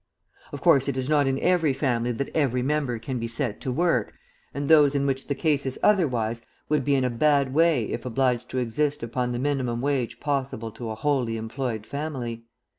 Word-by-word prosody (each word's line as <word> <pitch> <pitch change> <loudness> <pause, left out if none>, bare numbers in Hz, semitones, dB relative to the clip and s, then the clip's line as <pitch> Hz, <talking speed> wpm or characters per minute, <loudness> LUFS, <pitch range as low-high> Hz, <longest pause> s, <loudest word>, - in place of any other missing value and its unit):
Of - - -7
course 135 0 +4
it 140 -2 -1
is 130 +1 -2
not 145 -2 +3
in 135 0 +1
every 175 -6 +3
family 125 -3 0
that 130 +4 -4
every 130 -5 +1
member 140 -3 0
can 125 +3 -4
be 115 - -3
set 115 -1 -3
to 130 - -2
work, 170 +6 +1 0.4
and 140 0 -4
those 150 -2 +6
in 140 0 +1
which 135 -1 -1
the 140 - -1
case 145 -1 +1
is 130 -1 -3
otherwise 120 - +2 0.3
would 150 -2 +2
be 140 +2 +2
in 135 - +1
a 125 - +1
bad 140 +1 +2
way 160 -5 +3
if 115 - -4
obliged 125 -1 0
to 130 - -4
exist 140 +4 -1
upon 125 +1 -2
the 120 - -2
minimum 130 -3 -1
wage 135 -2 -1
possible 135 -6 -2
to 115 +1 -7
a 110 - -4
wholly 125 -3 0
employed 115 -1 -4
family. 125 -5 -5
130 Hz, 205 wpm, -25 LUFS, 120-145 Hz, 0.4 s, those